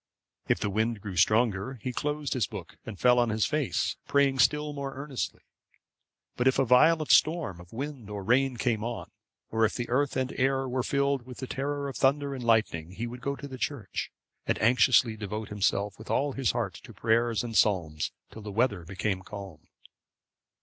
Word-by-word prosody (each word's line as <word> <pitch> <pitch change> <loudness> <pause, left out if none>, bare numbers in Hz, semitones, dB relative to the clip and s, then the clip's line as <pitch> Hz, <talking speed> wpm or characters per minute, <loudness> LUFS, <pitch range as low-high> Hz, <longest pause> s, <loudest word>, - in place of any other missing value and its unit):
If - - +2
the 100 - -1
wind 110 +2 0
grew 100 -2 -7
stronger, 110 +5 +2
he 125 - -3
closed 150 +1 -2
his 125 - 0
book, - - -8
and 105 -4 -7
fell 125 0 +5
on 120 -1 +2
his 110 0 +1
face, 150 -4 -1
praying 140 -2 +3
still 150 +3 +3
more 140 -1 -5
earnestly. 140 -1 -4 0.9
But, 125 - +1
if 130 - +4
a 135 - +3
violent 155 +6 +5
storm 155 - +3
of 85 - -16
wind 130 -3 -6
or 100 -1 -5
rain 125 +4 +2
came 115 -3 0
on, 115 -7 -5 0.4
or 115 0 +1
if 110 - +2
the 120 - -3
earth 140 +3 +1
and 130 0 -1
air 135 +1 +2
were 130 0 -1
filled 140 -1 0
with 125 - -9
the 130 - -5
terror 140 +2 -3
of 135 - -5
thunder 140 +1 +2
and 130 -2 -6
lightning, 110 -8 +1
he 110 +5 -4
would 120 +1 -7
go 140 +3 -2
to 140 - -8
the 130 -2 -9
church, 110 -4 -3 0.4
and - - +1
anxiously 120 0 +4
devote 105 0 -5
himself 100 0 0
with 110 - -11
all 145 +1 +1
his 135 -2 0
heart 115 -6 -1
to 115 - -13
prayers 115 +1 +1
and 115 -2 -5
psalms 80 -9 +2 0.2
till 110 - -10
the 105 0 -7
weather 105 -4 +1
became 95 +2 -2
calm. 95 -6 -10
120 Hz, 195 wpm, -28 LUFS, 105-135 Hz, 0.9 s, fell